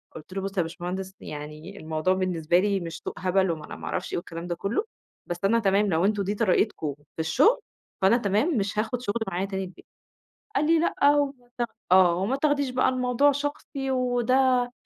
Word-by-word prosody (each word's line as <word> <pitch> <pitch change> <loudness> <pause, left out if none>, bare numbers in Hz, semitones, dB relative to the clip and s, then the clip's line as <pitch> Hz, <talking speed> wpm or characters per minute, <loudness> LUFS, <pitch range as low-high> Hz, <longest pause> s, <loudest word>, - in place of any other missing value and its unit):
قُلت 160 +4 -10
له: 195 - -2
"بُصّ 195 +1 -5
يا - - +4
باشمهندس 180 +3 -5
يعني 150 +6 -8
الموضوع 155 +3 0
بالنسبة 175 -2 +1
لي 200 0 +1
مش 165 -2 -6
سوق - - -3
هبل 185 0 +2
وما 155 -2 -5
أنا - - -8
ما - - -9
أعرفش - - -3
إيه - - 0
والكلام 170 -1 -6
ده 175 - -2
كلّه، 215 - -1 0.4
بس 175 - -4
أنا 230 +3 +4
تمام 200 0 +2
لو 165 +1 +2
أنتم 205 -1 +1
دي 205 +2 -2
طريقتكم 190 -8 +1
في 145 +2 -19
الشغل 255 - +4 0.4
فأنا 195 +5 +5
تمام 230 - +1
مش 205 +1 -1
هاخد 230 +3 -1
شغل 230 0 -2
معايا 190 0 -1
تاني 195 -1 -3
البيت"، 180 0 -11 0.7
قال 295 - +2
لي: 330 +1 +4
"لأ 290 -3 +3
وت"، 285 -1 +1 0.6
آه، 185 -2 +7
"وما 200 +9 0
تاخديش 285 -2 +1
بقى 255 0 +2
الموضوع 255 +2 +3
شخصي 285 -1 -4
وده 250 0 +2
200 Hz, 195 wpm, -26 LUFS, 175-255 Hz, 0.7 s, آه